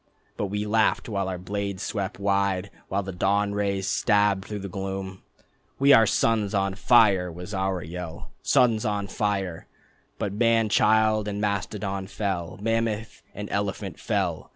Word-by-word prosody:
But 105 - -2
we 105 +2 -2
laughed 105 -1 +2
while 100 -4 -2
our 90 - -3
blades 100 +1 -4
swept 100 -3 -3
wide, 100 -1 0 0.2
While 100 +1 -1
the 95 - -5
dawn 100 +3 +1
rays 100 -1 -1
stabbed 100 -3 +2
through 105 - -4
the - - -3
gloom. 95 0 -5 0.6
"We 140 +1 +6
are 115 -3 +7
suns 110 -2 +1
on 95 0 +1
fire" 100 -4 +4
was 90 +5 -8
our 95 -2 -1
yell 85 0 -7
"Suns 115 -4 +3
on 105 -3 -1
fire."... 100 -4 -2 0.5
But 100 - -2
man 115 0 +3
child 110 0 +3
and 100 0 -3
mastodon 100 -1 -2
fell, 95 -5 -3
Mammoth 115 -1 -1
and 105 0 -5
elephant 100 -1 -3
fell. - - -2
100 Hz, 155 wpm, -26 LUFS, 95-105 Hz, 0.6 s, are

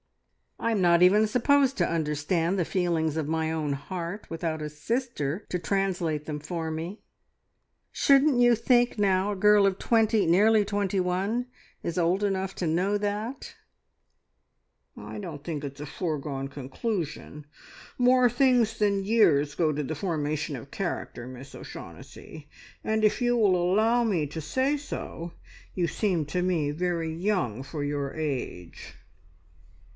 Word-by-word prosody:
I'm 230 -2 0
not 170 -1 +4
even 205 +4 +6
supposed 270 +4 +3
to - - +2
understand 165 +3 0
the 175 - +1
feelings 165 -4 0
of 155 -2 -1
my 160 0 -1
own 155 -3 -1
heart 175 +7 -6
without 165 -1 -3
a 150 - -4
sister 175 - -3
to 180 - -1
translate 175 -5 -1
them 150 -1 -4
for 160 +1 -4
me. 165 +6 -5 0.9
Shouldn't 275 -1 +4
you 240 0 +6
think, 240 +1 +2
now, 195 0 +2
a - - -2
girl 210 +1 +5
of 195 -1 +1
twenty 220 -3 +2
nearly 210 +5 +5
twenty 200 -1 -1
one 195 +7 -1 0.4
is 170 - -3
old 175 +4 +1
enough 195 -1 -1
to 175 - -2
know 185 +6 +1
that?" 210 +5 -4 1.4
"I - - -8
don't 160 -8 -7
think 155 -3 -4
it 140 -1 -5
is 145 - -11
a - - -4
foregone 140 -5 -3
conclusion. 150 - -5 0.5
More 250 0 +5
things 245 -2 +2
than 200 -2 +1
years 165 -10 +3
go 160 -3 +2
to 150 0 -2
the 155 +3 -4
formation 155 -3 -2
of 135 +2 -9
character, 170 -9 -4
Miss 130 +2 -10
O'Shaughnessy, 155 -2 -11 0.3
and 220 0 0
if 215 - +3
you 245 0 +2
will 205 -5 +4
allow 215 +7 +2
me 185 -9 +1
to 160 +3 -6
say 260 - 0
so, 170 - -6 0.4
you 175 -2 +1
seem 175 -2 0
to 180 +4 -1
me 170 -5 +1
very 165 0 -2
young 170 - -1
for 145 +1 -5
your 145 -1 -2
age." 135 - -5
180 Hz, 150 wpm, -27 LUFS, 155-210 Hz, 1.4 s, even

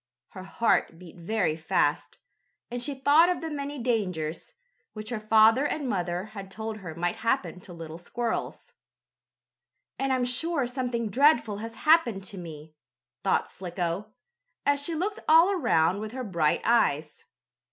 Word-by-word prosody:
Her 185 -1 -10
heart 205 -4 +1
beat 175 -2 -13
very 180 -2 0
fast, 145 -2 0 0.5
and 245 0 -4
she 280 +3 -2
thought 290 +6 +5
of 360 - 0
the 325 -1 -4
many 285 0 -4
dangers, 190 - -2 0.4
which 215 0 -7
her 230 - -2
father 220 +4 +5
and 295 -1 -2
mother 180 -4 -2
had 195 -2 -8
told 220 +2 -5
her 170 -6 -8
might 175 +1 -2
happen 230 -4 -1
to 180 - -13
little 165 -1 -8
squirrels. 240 - -4 1.3
"And 270 0 0
I'm 255 -1 +1
sure 280 +3 +1
something 245 -2 -2
dreadful 235 -4 +3
has 225 +2 -7
happened 275 -11 +4
to 190 0 -7
me!" 155 -2 -10 0.5
thought - - +1
Slicko, 175 +1 -4 0.6
as 285 0 +3
she 325 +3 -1
looked 400 +6 -2
all 330 +5 +7
around 200 - +2
with 215 +1 -6
her 260 0 -4
bright 170 -8 +1
eyes. 155 -10 +1
220 Hz, 150 wpm, -27 LUFS, 175-270 Hz, 1.3 s, all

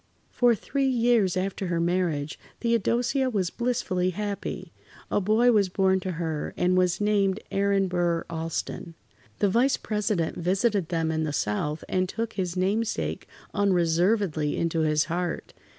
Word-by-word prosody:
For 245 -2 +3
three 275 +5 -1
years 235 -7 +2
after 190 0 -2
her 170 -1 0
marriage, 170 -4 -1 0.2
Theodosia 235 +3 +1
was 195 -7 -1
blissfully 235 -7 0
happy. 205 +2 -4 0.4
A - - +2
boy 220 +5 +4
was 205 -4 +3
born 190 0 +2
to 185 0 -4
her, 160 -3 -3
and 180 +1 +2
was 180 -1 +2
named 205 -1 +2
Aaron 200 -1 +2
Burr 175 -2 0
Alston. 165 0 -4 0.4
The 205 - +2
Vice 245 +7 +3
President 210 -6 -1
visited 190 +1 +1
them 165 -2 0
in 160 0 -1
the 155 - -1
South 145 +5 -2
and 185 -1 0
took 225 +1 -3
his 185 -2 -3
namesake 210 +5 -1 0.3
unreservedly 175 -3 +1
into 165 -1 0
his 155 -1 +2
heart. 175 +1 -3
185 Hz, 145 wpm, -26 LUFS, 170-210 Hz, 0.4 s, boy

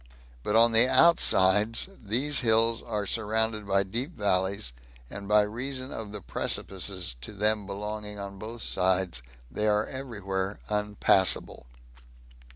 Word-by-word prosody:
But 105 - -2
on 115 +1 +6
the 115 +2 +7
outsides, 110 - +4 0.2
these 130 +8 0
hills 115 0 +2
are 105 -3 -4
surrounded 110 0 -1
by 100 0 +2
deep 120 - -4
valleys, 95 - -1 0.4
and 100 0 -7
by 105 0 +4
reason 130 +5 -5
of 110 -2 -6
the 105 -1 -7
precipices 90 -7 -3
to - - -8
them 105 0 +1
belonging 105 +1 -6
on 100 -1 -8
both 115 +2 -6
sides 90 -6 0 0.3
they 105 +8 -1
are 105 0 +2
every 130 -5 -7
where 95 0 -3
unpassable. 105 - +1
105 Hz, 135 wpm, -27 LUFS, 100-115 Hz, 0.4 s, the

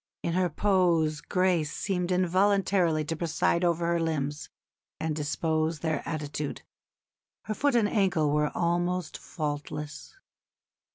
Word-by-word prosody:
In 170 - -1
her 180 0 +2
pose 170 -7 +2
grace 180 -5 +1
seemed 180 -2 -2
involuntarily 185 -3 +2
to 165 - -2
preside 170 +1 0
over 170 -1 +1
her 170 0 +1
limbs 150 -2 -2 0.5
and 160 -1 -1
dispose 155 +1 -1
their 160 -3 -1
attitude. 150 -2 -4 0.8
Her 215 - -3
foot 285 +3 +1
and 225 -3 +4
ankle 185 -9 +2
were 150 0 +2
almost 175 0 0
faultless." 145 - -5
170 Hz, 120 wpm, -28 LUFS, 155-180 Hz, 0.8 s, and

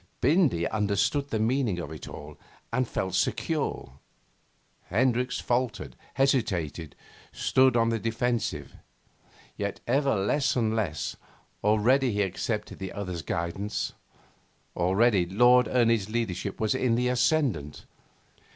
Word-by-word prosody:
Bindy 145 - +3
understood 105 +7 0
the 110 - -1
meaning 115 -2 +1
of 85 -3 -5
it 80 - -8
all 75 0 -9 0.4
and 130 +1 +1
felt 95 -4 -3
secure; 95 - -2 0.9
Hendricks 125 +4 +1
faltered, 125 -1 -2 0.2
hesitated, 100 - 0 0.4
stood 130 -2 +3
on 115 0 +3
the 115 -1 0
defensive. 115 +1 -2 0.8
Yet, 100 -1 -3
ever 135 +1 +2
less 105 +8 +1
and 110 -3 +1
less. 90 -9 -2 0.5
Already 115 +5 +3
he 105 0 +1
accepted 105 +3 -3
the 95 -1 -5
other's 90 -4 -4
guidance. 85 +7 -3 0.8
Already 95 +1 +3
Lord 120 +6 +5
Ernie's 115 -5 +2
leadership 105 -4 -3
was 110 +1 +1
in 130 -3 +1
the 125 +1 +1
ascendant. 125 - 0
115 Hz, 115 wpm, -27 LUFS, 95-125 Hz, 0.9 s, Lord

